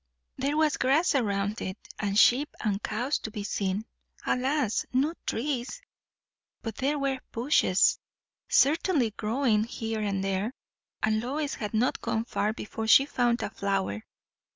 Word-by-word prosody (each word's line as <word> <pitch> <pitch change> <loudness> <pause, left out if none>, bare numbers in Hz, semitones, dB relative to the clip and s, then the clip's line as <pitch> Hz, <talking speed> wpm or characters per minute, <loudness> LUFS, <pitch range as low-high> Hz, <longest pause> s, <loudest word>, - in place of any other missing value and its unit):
There 280 +3 -1
was 310 -1 +3
grass 280 +7 +3
around 205 -5 0
it, 185 +2 -4 0.2
and 200 -1 -1
sheep 260 +7 +5
and 205 -2 -1
cows 250 +9 -1
to - - -5
be 210 -1 -5
seen. 200 0 -2 0.4
Alas, 260 -2 +1
no 275 +6 +1
trees. 265 - -2 0.8
But 225 -2 -5
there 285 +3 0
were 275 -2 -1
bushes 230 -6 +3 0.5
certainly 295 - +3
growing 220 0 +1
here 225 -1 -4
and 200 -2 -1
there, 195 +5 -1 0.5
and 215 0 +2
Lois 285 +4 -2
had 210 0 -4
not 240 +4 +1
gone 225 +1 -1
far 210 -3 0
before 220 0 -5
she 270 +4 +7
found 240 -4 +1
a - - -3
flower. 195 - -2
230 Hz, 145 wpm, -28 LUFS, 210-275 Hz, 0.8 s, she